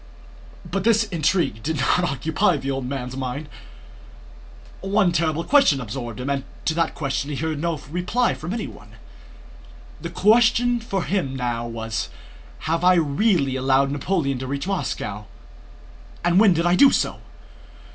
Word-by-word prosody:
But 195 -1 -3
this 225 0 +4
intrigue 170 - 0
did 160 +6 -2
not 135 +6 +2
now 180 - +1
occupy 160 - +1
the 135 0 -3
old 135 -2 -3
man's 130 -1 -4
mind. 135 +3 -4 1.3
One 195 -1 +2
terrible 165 -1 0
question 225 - +4
absorbed 120 -1 -6
him 125 - -4
and 140 -1 -1 0.2
to - - +1
that 165 0 0
question 140 -1 -2
he 145 - -3
heard 155 +2 -2
no 170 0 -1
reply 180 +9 0
from 165 +4 -6
anyone. 225 +1 -6 1.1
The - - -5
question 240 +2 +3
for 195 -5 -3
him 175 -9 -1
now 120 -2 -2
was: 115 -1 -4 0.5
"Have 165 +2 -1
I 180 0 +6
really 155 - +2
allowed 135 +1 +2
Napoleon 145 -2 -1
to 130 - -5
reach 140 +3 -3
Moscow, 140 - -3 1.0
and 175 +2 +4
when 200 -4 +5
did 170 +1 0
I 175 - +3
do 280 +7 +7
so? - - 0
155 Hz, 155 wpm, -23 LUFS, 135-185 Hz, 1.3 s, do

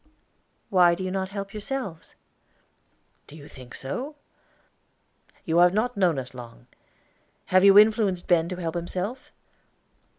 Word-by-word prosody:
"Why 175 -3 +5
do 185 - -6
you 185 - -3
not 190 0 -3
help 200 0 -7
yourselves?" 210 - -6 1.1
"Do 150 - -13
you 145 -2 -12
think 130 -4 -13
so? 250 - -5 1.3
You 165 +1 +1
have 175 +2 +5
not 240 +3 0
known 180 -6 +2
us 130 -1 -6
long. 120 - -12 0.9
Have 185 0 +6
you 200 0 +7
influenced 210 -4 +4
Ben 170 -1 +2
to 185 - -4
help 165 -3 -4
himself?" 185 +8 -5
185 Hz, 135 wpm, -25 LUFS, 165-205 Hz, 1.3 s, you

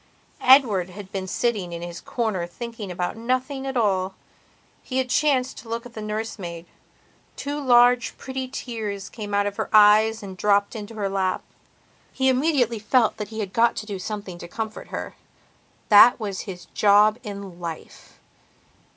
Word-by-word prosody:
Edward 230 -9 +5
had 190 +1 -10
been 190 -1 -4
sitting 205 -4 -1
in 170 0 -6
his 175 -1 -7
corner 215 -8 -2
thinking 230 +2 -7
about 180 0 -3
nothing 255 +4 -2
at 265 -1 -2
all. 190 -4 +1 0.7
He 255 - -5
had 255 -1 0
chanced 265 -3 +1
to 230 - -13
look 230 +1 -4
at 245 - -11
the 220 - -7
nurse 215 +1 -4
maid; 170 -2 -7 0.7
two 290 +1 -4
large, 245 -1 +4
pretty 260 0 -5
tears 220 -6 -5
came 205 -2 -5
out 205 0 +2
of 205 0 -3
her - - -2
eyes 215 +1 +5
and 190 -2 -8
dropped 200 +2 +2
into 220 +1 -7
her 205 -2 -1
lap. 190 -1 -1 0.7
He 265 0 +1
immediately 255 -4 +1
felt 220 +2 +2
that 210 - -4
he 220 +1 -5
had 195 -2 -5
got 230 0 +3
to 215 - -5
do 200 -3 -5
something 195 -2 -6
to 170 - -8
comfort 220 +4 -6
her. - - -6 0.7
That 220 +4 +8
was 200 -4 -4
his 180 -2 -8
job 210 +2 +4
in 200 -5 -8
life. 165 -2 -9
215 Hz, 170 wpm, -24 LUFS, 195-240 Hz, 0.7 s, That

